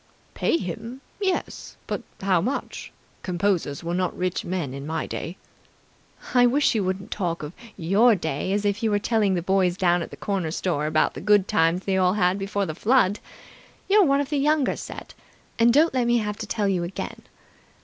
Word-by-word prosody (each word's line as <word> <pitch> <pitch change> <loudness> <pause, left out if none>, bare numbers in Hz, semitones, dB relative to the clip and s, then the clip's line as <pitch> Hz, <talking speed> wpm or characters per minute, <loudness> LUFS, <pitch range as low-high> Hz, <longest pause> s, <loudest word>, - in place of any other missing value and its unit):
"Pay - - +1
him? 225 - -6 0.2
Yes, 380 -2 -2
but - - -3 0.2
how 190 -3 +2
much? 255 +9 -4 0.3
Composers 175 -5 -1
were 170 +1 -3
not 180 0 -1
rich 180 -1 -1
men 170 -7 -3
in 140 +1 -7
my 160 - -2
day." 175 +4 -6 1.0
"I 245 -1 +6
wish 280 +4 +3
you 215 -3 0
wouldn't 190 +2 -3
talk 170 -5 -2
of 150 +3 -6 0.2
'your 200 +7 +4
day' 160 0 -3
as 205 +1 0
if 205 +2 0
you 215 -2 +2
telling 205 -2 +1
the 175 - -2
boys 185 -1 +2
down 175 -2 +2
at - - -5
the - - -11
corner 195 -5 -2
store 155 -2 -1
about 155 0 +2
the 135 - -7
good 205 0 +4
times 175 -2 +2
they 195 -1 +1
all 185 -1 +3
had 190 -1 +1
before 200 0 -1
the 155 - -4
Flood. 210 +1 +2 0.7
You're 410 +1 +5
one 275 -1 +3
of 285 -1 -2
the 290 - +1
Younger 295 -1 +2
Set - - -9 0.5
and 230 +1 +6
don't 300 +5 +4
let 250 -2 +1
me 240 0 +3
have 210 -2 -2
to 220 - -5
tell 210 -1 0
you 190 -3 +1
again. 175 +2 -6
195 Hz, 195 wpm, -24 LUFS, 175-225 Hz, 1.0 s, I